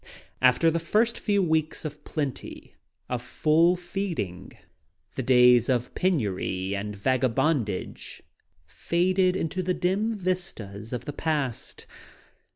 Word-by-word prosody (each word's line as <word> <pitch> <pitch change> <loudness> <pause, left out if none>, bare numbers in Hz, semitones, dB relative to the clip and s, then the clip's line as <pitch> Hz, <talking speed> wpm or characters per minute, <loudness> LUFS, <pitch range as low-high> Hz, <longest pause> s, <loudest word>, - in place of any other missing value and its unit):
After 130 +6 +4
the 170 - 0
first 215 +8 +1
few 200 -2 +1
weeks 160 -2 0
of 150 0 -7
plenty, 145 -4 -5 0.3
of 125 -1 -3
full 160 +8 +3 0.2
ing, 155 - -3 0.6
the - - -3
days 125 -2 +5
of 125 -1 0
penury 100 - -1
and 105 +1 -4
vagabondage 125 - -1 0.4
faded 180 - +1
into 185 +1 -2
the 180 0 -1
dim 205 +5 0
vistas 175 - -4
of 125 - -4
the 145 - -5
past. 145 -7 -3
150 Hz, 115 wpm, -26 LUFS, 120-180 Hz, 0.6 s, days